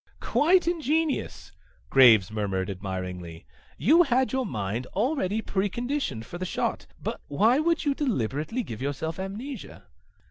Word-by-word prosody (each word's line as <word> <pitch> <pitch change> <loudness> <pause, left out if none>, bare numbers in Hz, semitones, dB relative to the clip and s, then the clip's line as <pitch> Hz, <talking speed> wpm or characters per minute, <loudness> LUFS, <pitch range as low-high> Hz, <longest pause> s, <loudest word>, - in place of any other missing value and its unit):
"Quite 355 +4 +3
ingenious," 320 -2 -1 0.4
Graves 115 -8 +7
murmured 100 -3 -2
admiringly. 90 -3 -6 0.3
"You 325 +7 +5
had 260 -5 +2
your 260 -2 0
mind 110 +4 -3
already 220 -2 0
preconditioned 205 - -2
for 175 - -8
the - - -3
shot. 185 - -2
But - - -4
why 220 - +3
would 330 +1 +1
you 285 - +3
deliberately 210 - -1
give 110 - -7
yourself 155 +5 -3
amnesia?" 215 +9 -6
190 Hz, 130 wpm, -26 LUFS, -, 0.4 s, Graves